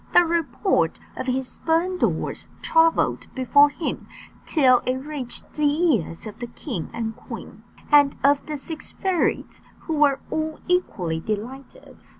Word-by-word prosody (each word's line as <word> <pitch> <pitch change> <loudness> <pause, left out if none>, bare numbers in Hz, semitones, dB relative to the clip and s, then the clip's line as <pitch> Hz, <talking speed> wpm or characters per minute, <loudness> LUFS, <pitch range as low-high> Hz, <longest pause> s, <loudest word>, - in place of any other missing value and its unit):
The 350 - +8
report 335 - 0 0.2
of - - -5
his 260 0 0
splendours 345 +5 -1 0.2
travelled 325 0 +3
before 280 +3 +5
him, 300 +3 -4 0.4
till 255 -6 +5
it 255 +1 -1
reached 270 -2 -6
the 300 - -2 0.3
ears 165 -5 -2
of 215 +1 -9
the 240 - -4
king 235 - -6
and 225 -1 -4
queen, - - -10 0.3
and 285 -1 +6
of 285 +1 +4
the 305 -1 -3
six 315 +2 -6
fairies, 375 -4 -1 0.2
who 320 - -4
were 280 -2 +4
all 315 0 -2
equally 185 - 0
delighted. 245 - -7
285 Hz, 140 wpm, -24 LUFS, 245-320 Hz, 0.4 s, The